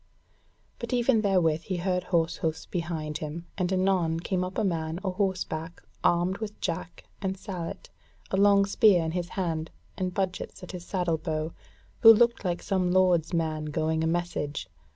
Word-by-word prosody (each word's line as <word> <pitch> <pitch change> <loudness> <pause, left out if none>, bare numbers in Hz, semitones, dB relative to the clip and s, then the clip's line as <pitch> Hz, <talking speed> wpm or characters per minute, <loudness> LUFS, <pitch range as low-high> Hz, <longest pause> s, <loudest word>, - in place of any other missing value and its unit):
But - - -4
even 240 -2 +3
therewith 175 -6 +2
he 185 +1 -3
heard 180 0 -1
horsehoofs 165 -2 0
behind 160 -4 -3
him, 160 +2 -5
and 180 -1 -1
anon 185 -3 +2
came 180 +1 -1
up 185 +1 -5
a 220 - +1
man 165 -3 -1
a 190 - 0
horseback, 180 -4 -2 0.2
armed 175 +3 +2
with 215 -2 -6
jack 165 0 -4 0.2
and 190 -1 -2
sallet, 185 -4 -6 0.4
a 190 - +1
long 200 0 +5
spear 195 -3 +4
in 160 - -1
his 175 0 -3
hand, 165 -4 -1 0.3
and 185 -1 -2
budgets 190 0 -3
at 180 - -7
his 175 -1 -8
saddle 175 -4 0
bow, 155 +1 -3 0.5
who 225 - +10
looked 235 +1 +4
like 175 -2 -2
some 185 -2 +1
lord's 180 -3 +3
man 160 -3 -1
going 160 +1 0
a - - +1
message. 165 - -2
180 Hz, 170 wpm, -28 LUFS, 160-190 Hz, 0.5 s, who